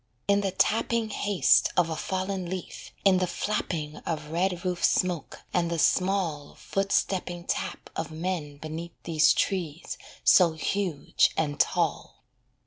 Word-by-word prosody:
In 200 0 +4
the 195 - 0
tapping 225 +3 +1
haste 205 -2 +3
of 170 -2 +3
a - - -1
fallen 190 0 -3
leaf, 185 -1 -6 0.2
In 190 -2 +6
the 185 - +1
flapping 170 -5 -3
of 155 -2 -4
red 180 +1 -1
roof 180 -1 -2
smoke, 180 -5 0
and 170 -1 +1
the 170 - -1
small 175 -2 +1
Foot 195 0 -2
stepping 175 -2 0
tap - - -4
of 165 - -3
men 160 -3 -4
beneath 160 +3 -6
These 160 -2 +4
trees 170 -4 -2 0.2
so 175 -3 +6
huge 175 -1 +1
and 150 -2 -1
tall. - - 0
175 Hz, 140 wpm, -27 LUFS, 160-190 Hz, 0.2 s, In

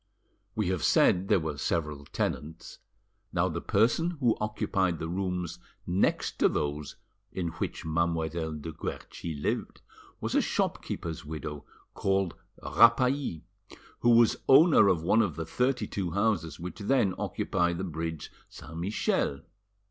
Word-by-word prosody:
We 105 -5 0
have 90 -4 -1
said 95 +2 +4
there - - +4
were 80 -3 -4
several 75 -3 -2
tenants: 80 +3 -4 0.5
now - - +1
the - - -4
person 155 - +2
who 120 -4 +3
occupied 95 -4 0
the 80 - -4
rooms 90 -1 -3 0.3
next 90 +3 0
to - - +5
those 75 0 -3 0.4
in 90 -3 -2
which 80 - -5
Mademoiselle 80 0 -1
de 75 +2 -6
Guerchi 80 +1 -6
lived - - -2 0.4
was - - -3
a - - +4
shopkeeper's 80 -2 -2
widow 75 -1 -6 0.3
called 95 -3 0 0.3
Rapally, 125 - +3 0.6
who 120 - +3
was 115 -2 +5
owner 145 - +7
of 85 -4 +2
one 110 +6 +4
of 95 -9 -1
the 80 - -4
thirty 125 +5 0
two 95 -3 -3
houses 90 -5 0
which 90 +5 -7
then 105 -2 +2
occupied 85 -2 0
the 95 - -3
bridge 80 -2 -4 0.2
Saint 80 - -10
Michel. 85 -7 0
90 Hz, 140 wpm, -29 LUFS, 80-105 Hz, 0.6 s, owner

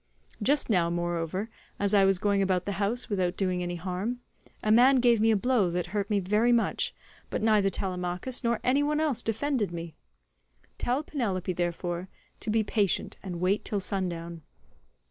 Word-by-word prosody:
Just 280 +6 +2
now, 175 -6 +2
moreover, 175 +3 -2 0.3
as 200 0 +1
I 200 -2 +6
was 195 -1 +4
going 200 +1 +1
about 185 -2 +1
the 200 - -2
house 230 +5 -1
without 185 -4 -1
doing 185 -2 0
any 175 0 -3
harm, 185 +7 -3 0.4
a 215 - +2
man 250 +5 +6
gave 240 -3 +4
me 225 - +4
a 220 - +4
blow 235 -4 +2
that 175 0 -1
hurt 200 -1 -1
me 205 -2 +2
very 210 +6 +2
much, 235 -2 +1 0.3
but - - -3
neither 210 -3 +4
Telemachus 185 +6 -2
nor 235 -1 +1
any 265 +3 +3
one 300 +1 +1
else 290 -7 0
defended 225 -2 -1
me. 170 -1 -6 0.9
Tell 255 +5 0
Penelope, 200 - -2
therefore, 175 +1 -3 0.3
to - - -3
be 220 +1 +2
patient 205 -3 0
and 180 -3 -6
wait 190 +4 +1
till 205 - -1
sundown. 170 -3 -3
200 Hz, 175 wpm, -28 LUFS, 180-230 Hz, 0.9 s, I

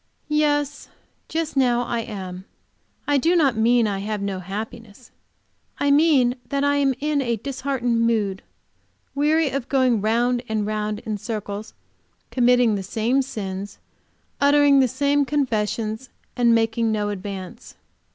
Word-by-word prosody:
"Yes, 290 -1 0 0.4
just 325 -2 -2
now 245 -3 +2
I 235 -1 -2
am. 190 -5 -7 0.6
I 290 -1 +3
do 335 +6 +2
not 280 -8 +3
mean 230 +1 +3
that 205 -2 -1
I - - -4
have 210 +1 -3
no 200 -1 -3
happiness; 215 +4 -8 0.7
I 285 - +1
mean 280 -5 +4
that 280 0 0
I 285 0 +2
am 275 -2 +2
in 295 -1 0
a 235 -3 0
disheartened 245 -1 -2
mood, 210 -4 0 0.7
weary 300 +1 +2
of 270 -3 -4
going 255 -5 +2
round 240 +3 +1
and 215 -1 -1
round 215 0 -2
in 215 -2 -4
circles, 210 -1 -5 0.6
committing 245 -2 +3
the 200 - -2
same 225 +7 0
sins, 200 -6 -6 0.6
uttering 285 0 +5
the 260 - +4
same 285 +3 +1
confessions, 230 -4 -2 0.3
and 235 -1 +4
making 225 0 +1
no 210 -1 -1
advance." 200 +3 -7
240 Hz, 140 wpm, -23 LUFS, 215-275 Hz, 0.7 s, uttering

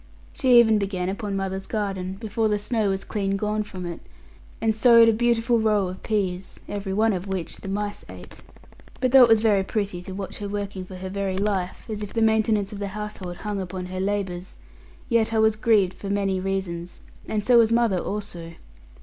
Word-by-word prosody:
She 250 -2 +5
even 220 -2 +5
began 190 -2 -2
upon 200 0 -3
mother's 195 0 -3
garden 195 -4 -3
before 220 +2 -1
the 210 - +1
snow 210 0 0
was 195 0 -1
clean 195 -2 -2
gone 210 +1 -1
from 190 -4 -7
it, 170 -1 -5 0.6
and 225 -1 +1
sowed 230 +1 +6
a 225 - +5
beautiful 235 +1 +2
row 210 -4 +2
of 185 - -8
peas, 190 -4 -2
every 200 -1 -4
one 215 +2 +2
of 185 +1 -4
which 185 -4 -4
the - - -10
mice 205 +1 -3
ate. - - -11 0.6
But 255 -2 +1
though 265 0 +8
it 240 - +7
was 225 -1 +5
very 205 -3 +3
pretty 200 -3 -2
to 185 +1 -8
watch 195 0 -6
her 205 -1 -4
working 200 -2 -4
for 185 - -10
her 185 +1 -6
very 195 -1 -2
life, 195 -2 -2
as 215 -1 -4
if 205 - -6
the 230 - 0
maintenance 220 -2 +2
of 200 - -7
the 200 - -3
household 200 -4 -6
hung 205 -2 -2
upon 185 0 -5
her 185 +1 -5
labours, 190 -2 -3 0.5
yet 230 -2 +2
I - - +1
was 220 0 +4
grieved 215 -5 +3
for 200 - -7
many 195 -2 0
reasons, 185 -2 -4 0.3
and 210 -1 -2
so 245 -2 +6
was 225 -1 +4
mother 230 -5 +3
also. 175 -5 -5
205 Hz, 205 wpm, -24 LUFS, 190-220 Hz, 0.6 s, though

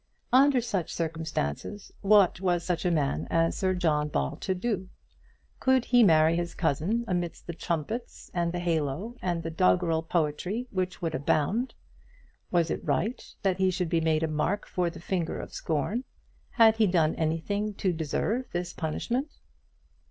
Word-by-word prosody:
Under 270 0 +6
such 200 -8 -2
circumstances, 160 - -3
what 200 -4 +5
was 175 -2 +1
such 180 0 -1
a - - +4
man 150 -5 0
as 165 0 +2
Sir 185 -1 0
John 155 -4 +1
Ball 150 +1 -1
to 190 +2 -2
do? 190 -2 -2 0.7
Could 260 -2 +3
he 245 -1 +5
marry 160 -5 +5
his 170 0 -3
cousin 180 - 0
amidst 175 -3 -2
the 170 - -5
trumpets, 170 - -4
and 170 -1 0
the 175 - -3
halo, 170 - -1
and 175 -2 -1
the 165 - -4
doggrel 160 - +2
poetry 170 +7 -1
which 185 -2 -3
would 165 -2 -1
abound? 155 - 0 0.7
Was 170 -2 +2
it - - -3
right 235 +4 -1 0.2
that 190 -2 +2
he 190 0 +4
should 180 -2 -1
be 165 -1 +2
made 160 0 +2
a - - +2
mark 155 +7 -1
for 180 -1 -1
the 170 - -10
finger 170 -1 -2
of - - -8
scorn? 185 - -1 0.5
Had 225 -2 +5
he 220 -2 +4
done 165 -4 +3
anything 200 +7 -1
to 185 -2 0
deserve 170 - -1
this 175 0 -3
punishment? 240 - -2
175 Hz, 165 wpm, -28 LUFS, 160-205 Hz, 0.7 s, Under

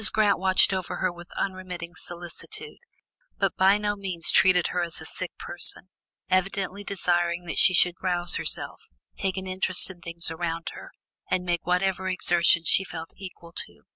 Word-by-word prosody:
Grant 210 -2 +3
watched 190 +1 +4
over 190 -1 -3
her 185 - 0
with 175 0 -13
unremitting 185 -3 -4
solicitude, 175 - -8 0.6
but - - 0
by 190 +2 +5
no 210 0 -1
means 185 -5 -1
treated 180 -2 +4
her 180 - -1
as 170 -1 +1
a 160 - -9
sick 185 +2 -2
person, 175 +1 +2 0.4
evidently 195 +2 -1
desiring 175 -3 -1
that 165 - -1
she 185 - +6
should 175 +1 +3
rouse 175 -2 -1
herself, - - -3 0.3
take 190 0 -2
an 190 - -4
interest 185 0 +2
in 175 -2 -16
things 170 -1 -5
around 165 0 -3
her, - - -10 0.4
and 185 -1 0
make 175 -1 -2
whatever 190 +1 0
exertion 170 -2 +3
she 195 - +4
felt 165 -3 -8
equal 180 -3 -11
to. - - -6
180 Hz, 170 wpm, -26 LUFS, 175-190 Hz, 0.6 s, she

